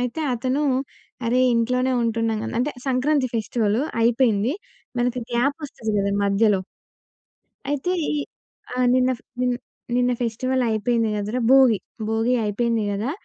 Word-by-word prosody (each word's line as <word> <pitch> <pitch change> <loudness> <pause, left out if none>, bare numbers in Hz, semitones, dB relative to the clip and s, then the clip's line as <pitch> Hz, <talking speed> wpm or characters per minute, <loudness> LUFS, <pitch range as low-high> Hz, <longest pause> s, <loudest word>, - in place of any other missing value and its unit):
అయితే 250 +6 -2
అతను 260 +5 -1 0.6
"అరే! 250 +2 +2
ఇంట్లోనే 250 +3 +1
ఉంటున్నాం" 225 -1 0 0.2
అంటే 265 +5 +1 0.2
సంక్రాంతి 265 +1 +1
ఫెస్టివల్ 220 -1 0 0.2
అయిపోయింది. 230 +1 +2 0.4
మనకి 245 +1 0
గ్యాప్ 255 +4 +1
వస్తది 220 -6 -4
కదా! 200 0 0
మధ్యలో. 200 0 +3 1.1
అయితే 290 +5 -1 0.2
ఈ - - 0 0.7
ఆహ్, 255 - +2
నిన్న 255 0 +3
ఫ - - -23 0.8
"నిన్న 250 0 +2
ఫెస్టివల్ 255 +3 0
అయిపోయింది 225 +1 +1
కదరా! 210 +5 -2
భోగి, 260 -6 +6 0.3
భోగి 225 +3 +1
అయిపోయింది 225 +1 0
కదా! 210 +6 -2
240 Hz, 120 wpm, -23 LUFS, 220-255 Hz, 1.1 s, భోగి